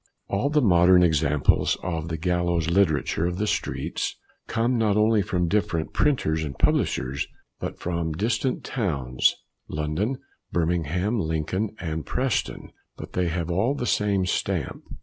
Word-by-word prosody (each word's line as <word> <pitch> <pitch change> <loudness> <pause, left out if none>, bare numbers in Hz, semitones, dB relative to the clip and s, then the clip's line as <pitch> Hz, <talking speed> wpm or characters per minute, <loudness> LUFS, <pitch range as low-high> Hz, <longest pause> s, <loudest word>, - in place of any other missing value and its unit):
All 100 +8 0
the 150 -1 +2
modern 90 -2 +6
examples 75 -4 +2
of 85 -3 -3
THE 80 -1 -3
"GALLOWS" 85 0 0
LITERATURE 85 -2 +2
OF 90 0 -3
THE 105 - 0
STREETS - - -2 0.3
come 120 +3 +1
not 110 -3 +2
only 110 0 +4
from 90 -4 0
different 100 -4 0
printers 80 - +1
and 70 -3 -5
publishers, 65 +3 +1 0.3
but - - -5
from 85 -2 -2
distant 115 - -1
towns, 70 - 0 0.3
London, 75 - -2 0.3
Birmingham, 90 +5 0
Lincoln, 80 +6 -2
and 80 -2 -3
Preston, 130 0 -2 0.3
but - - -9
they 90 -1 +1
have 85 0 -2
all 115 +11 +1
the 125 - -3
same 100 -4 +1
stamp. 90 - -2
90 Hz, 140 wpm, -25 LUFS, 80-105 Hz, 0.3 s, modern